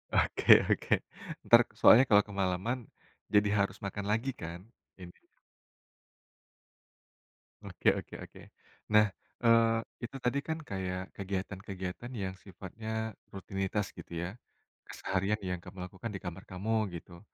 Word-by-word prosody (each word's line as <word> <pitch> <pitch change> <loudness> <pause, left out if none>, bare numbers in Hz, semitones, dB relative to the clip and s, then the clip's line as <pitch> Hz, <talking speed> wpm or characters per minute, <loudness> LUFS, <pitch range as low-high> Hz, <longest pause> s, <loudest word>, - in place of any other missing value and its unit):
Oke - - +6
oke. - - +1 0.5
Entar - - +8 0.2
soalnya 125 +4 +8
kalau 105 -1 +7
kemalaman 100 +5 -1 0.5
jadi 105 0 +5
harus 100 0 0
makan 100 0 -4
lagi, 115 +5 0
kan, 85 -6 -8 0.4
ini 90 -1 -9 2.5
Oke - - -4
oke - - -7
oke. - - -13 0.5
Nah, 105 0 +6 0.3
eee, 115 -1 +5 0.3
itu 120 - -10
tadi 125 +3 +1
kan, 160 0 -1
kayak 95 -1 -3
kegiatan-kegiatan 95 +2 -5
yang 95 -5 -3
sifatnya 110 +3 -5 0.2
rutinitas 95 +1 -2
gitu, - - -11
ya. 85 - -3 0.6
Keseharian 95 +2 -1
yang 90 -1 -2
kamu 90 +1 -8
lakukan 95 +5 -7
di - - -2
kamar 90 +1 -7
kamu, 110 +3 -1
gitu. 85 +1 -11
100 Hz, 120 wpm, -31 LUFS, 95-110 Hz, 2.5 s, Entar